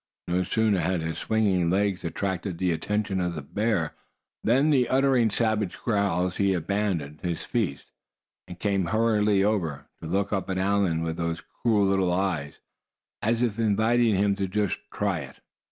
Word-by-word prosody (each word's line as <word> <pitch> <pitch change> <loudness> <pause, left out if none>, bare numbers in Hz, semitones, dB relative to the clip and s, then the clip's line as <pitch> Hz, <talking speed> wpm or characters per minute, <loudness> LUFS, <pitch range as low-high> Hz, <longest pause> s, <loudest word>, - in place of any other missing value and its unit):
No 90 +1 +1
sooner 110 0 +1
had 90 +1 0
his 80 0 -3
swinging 100 -6 +1
legs 100 0 +1
attracted 90 +1 -3
the 90 0 +1
attention 100 +3 -1
of 90 -1 -2
the 75 - -5
bear, 100 0 -1 0.5
than 135 +7 +3 0.2
uttering 130 -3 +3
savage 110 -3 0
growls 95 -5 0
he 100 -1 +2
abandoned 85 -4 -2
his 85 -2 -3
feast, 100 - -2 0.6
and 90 - -9
came 100 -3 +1
hurriedly 105 0 +2
over, 85 -9 -1 0.2
to 80 - -6
look 100 +5 0
up 95 -1 -2
at 95 - -1
Allan 95 -4 +1
with 80 0 -3
those 85 -1 -3 0.2
cruel 110 -4 +3
little 95 -2 +2
eyes, 90 -6 -1 0.7
as 115 +2 +1
if 115 -2 -1
inviting 110 +1 +3
him 100 +1 +2
to 100 -1 -1
just 100 0 -1
try 100 -4 -1
it. 65 -3 -9
95 Hz, 160 wpm, -26 LUFS, 85-105 Hz, 0.7 s, than